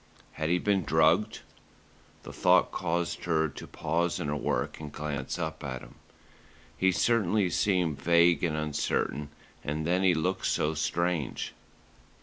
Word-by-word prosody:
Had 80 Hz, 0 st, -3 dB
he 90 Hz, -, +3 dB
been 100 Hz, 0 st, +1 dB
drugged? 80 Hz, +6 st, +2 dB, 0.8 s
The -, -, -9 dB
thought -, -, +4 dB
caused 85 Hz, +1 st, -2 dB
her 80 Hz, -2 st, +2 dB
to 70 Hz, -, -10 dB
pause 85 Hz, +2 st, -1 dB
in 75 Hz, -, -3 dB
her 75 Hz, -, -1 dB
work 60 Hz, -3 st, -2 dB
and 75 Hz, -2 st, -7 dB
glance 70 Hz, -2 st, -4 dB
up 80 Hz, -2 st, -4 dB
at 65 Hz, -3 st, -4 dB
him. -, -, -13 dB, 0.8 s
He 95 Hz, 0 st, +3 dB
certainly 105 Hz, -2 st, +2 dB
seemed 85 Hz, -7 st, +1 dB
vague 85 Hz, +2 st, +4 dB
and 80 Hz, -3 st, 0 dB
uncertain, 75 Hz, -1 st, -1 dB, 0.3 s
and 75 Hz, +2 st, -3 dB
then 90 Hz, +2 st, +2 dB
he 95 Hz, -2 st, +4 dB
looked 90 Hz, +4 st, -1 dB
so 75 Hz, -, +1 dB
strange. 85 Hz, -2 st, -1 dB
80 Hz, 145 wpm, -29 LUFS, 75-90 Hz, 0.8 s, thought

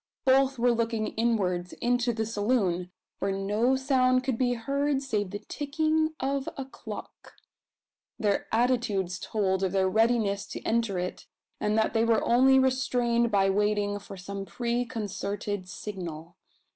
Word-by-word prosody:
Both 270 Hz, 0 st, +4 dB
were 240 Hz, +1 st, +3 dB
looking 230 Hz, -2 st, 0 dB
inwards 190 Hz, -6 st, 0 dB
into 245 Hz, 0 st, +1 dB
the 220 Hz, -1 st, -2 dB
saloon, 205 Hz, -5 st, 0 dB, 0.3 s
where 195 Hz, -, 0 dB
no 210 Hz, +6 st, +1 dB
sound 255 Hz, -1 st, +2 dB
could 260 Hz, -2 st, 0 dB
be 245 Hz, +1 st, +1 dB
heard 275 Hz, +4 st, 0 dB
save 210 Hz, -7 st, -1 dB
the 205 Hz, -, -4 dB
ticking 315 Hz, +2 st, 0 dB
of 275 Hz, 0 st, -1 dB
a 270 Hz, -, -4 dB
clock. 265 Hz, -, -10 dB, 0.8 s
Their 205 Hz, -2 st, 0 dB
attitudes 220 Hz, -6 st, +1 dB
told 190 Hz, -3 st, 0 dB
of 190 Hz, -1 st, 0 dB
their 190 Hz, -1 st, +3 dB
readiness 220 Hz, -1 st, +2 dB
to -, -, -7 dB
enter 225 Hz, -4 st, 0 dB
it, 180 Hz, 0 st, -4 dB, 0.3 s
and 210 Hz, +1 st, +1 dB
that 220 Hz, -, +2 dB
they 225 Hz, -1 st, +3 dB
were 230 Hz, -1 st, +3 dB
only 265 Hz, +3 st, +5 dB
restrained 245 Hz, -2 st, +2 dB
by 195 Hz, -2 st, +3 dB
waiting 205 Hz, 0 st, +1 dB
for 200 Hz, -1 st, -10 dB
some 195 Hz, +2 st, -6 dB
preconcerted 205 Hz, -2 st, -3 dB
signal. 175 Hz, -5 st, -7 dB
225 Hz, 145 wpm, -28 LUFS, 200-255 Hz, 0.8 s, only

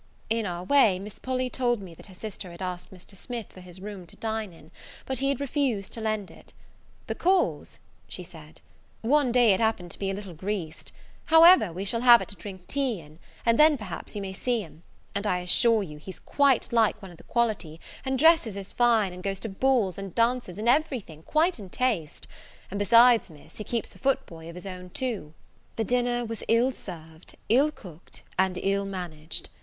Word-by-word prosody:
In 225 Hz, -2 st, +1 dB
our 175 Hz, 0 st, -4 dB
way, 215 Hz, -3 st, +4 dB
Miss 200 Hz, +2 st, -9 dB
Polly 255 Hz, 0 st, -1 dB
told 245 Hz, -2 st, 0 dB
me 185 Hz, -4 st, -10 dB
that 165 Hz, -, -14 dB
her 190 Hz, -, -14 dB
sister 195 Hz, -2 st, -7 dB
had 170 Hz, -, -12 dB
asked 180 Hz, -1 st, -5 dB
Mr. 190 Hz, +1 st, -13 dB
Smith 235 Hz, +3 st, -6 dB
for 185 Hz, -, -12 dB
his 180 Hz, 0 st, -10 dB
room 195 Hz, -2 st, -8 dB
to -, -, -13 dB
dine 220 Hz, -3 st, -3 dB
in, 160 Hz, -2 st, -17 dB, 0.3 s
but 265 Hz, -2 st, 0 dB
he 275 Hz, -, +1 dB
had 275 Hz, -, 0 dB
refused 270 Hz, -7 st, -1 dB
to 230 Hz, -, -4 dB
lend 215 Hz, -3 st, -2 dB
it; -, -, -17 dB, 0.5 s
"because," 370 Hz, 0 st, 0 dB, 0.3 s
she 180 Hz, -, -6 dB
said, 160 Hz, -3 st, -14 dB, 0.4 s
"one 270 Hz, +2 st, +3 dB
day 240 Hz, -4 st, +5 dB
it 190 Hz, -, 0 dB
happened 220 Hz, -6 st, 0 dB
to -, -, -7 dB
be 195 Hz, -, -1 dB
a 195 Hz, -, -2 dB
little 195 Hz, -3 st, -7 dB
greased: 180 Hz, -1 st, -5 dB, 0.3 s
however, 325 Hz, -, +7 dB
we 185 Hz, +4 st, -5 dB
shall 230 Hz, +3 st, 0 dB
have 240 Hz, -1 st, +8 dB
it -, -, -6 dB
to 200 Hz, -, -4 dB
drink 185 Hz, 0 st, -9 dB
tea 265 Hz, -5 st, -1 dB
in, 155 Hz, 0 st, -16 dB, 0.3 s
and 230 Hz, 0 st, +3 dB
then, 305 Hz, -1 st, +6 dB
perhaps, 210 Hz, -4 st, -7 dB
you 205 Hz, -, -3 dB
may 190 Hz, -1 st, -5 dB
see 240 Hz, +3 st, -1 dB
him; 165 Hz, -3 st, -13 dB, 0.3 s
and 200 Hz, 0 st, -2 dB
I 180 Hz, -, +1 dB
assure 215 Hz, +5 st, +3 dB
you 150 Hz, -5 st, -9 dB
he's 185 Hz, +5 st, -10 dB
quite 280 Hz, -4 st, +2 dB
like 225 Hz, -3 st, +3 dB
one 195 Hz, -3 st, -11 dB
of 170 Hz, -, -14 dB
the -, -, -16 dB
quality, 215 Hz, -10 st, -1 dB, 0.2 s
and 265 Hz, 0 st, -1 dB
dresses 320 Hz, -, +4 dB
as 195 Hz, -1 st, -7 dB
fine, 225 Hz, -6 st, +3 dB
and 180 Hz, -, -9 dB
goes 195 Hz, 0 st, -3 dB
to 225 Hz, -, -4 dB
balls 210 Hz, -3 st, +1 dB
and 195 Hz, -3 st, -7 dB
dances, 230 Hz, -5 st, +1 dB
and 215 Hz, +2 st, -3 dB
every 275 Hz, +1 st, +3 dB
thing, 160 Hz, -5 st, -14 dB
quite 315 Hz, -, +1 dB
in 195 Hz, -3 st, -9 dB
taste; 205 Hz, -10 st, -2 dB, 0.4 s
and 200 Hz, -, -3 dB
besides, 230 Hz, +2 st, +6 dB
Miss, 155 Hz, -3 st, -16 dB
he 215 Hz, -, -5 dB
keeps 230 Hz, +1 st, -3 dB
a -, -, -16 dB
foot 270 Hz, 0 st, +1 dB
boy 165 Hz, -1 st, -11 dB
of 170 Hz, -, -10 dB
his 180 Hz, -, -9 dB
own 185 Hz, -1 st, -7 dB
too." 200 Hz, -9 st, -4 dB, 0.4 s
The 225 Hz, -, 0 dB
dinner 245 Hz, +1 st, 0 dB
was 225 Hz, -1 st, -6 dB
ill 235 Hz, +3 st, +3 dB
served, 165 Hz, -7 st, -11 dB
ill 270 Hz, +7 st, +5 dB
cooked, 180 Hz, -, -12 dB, 0.2 s
and 190 Hz, -1 st, +2 dB
ill 200 Hz, 0 st, +1 dB
managed. 165 Hz, -5 st, -6 dB
205 Hz, 210 wpm, -27 LUFS, 180-245 Hz, 0.5 s, have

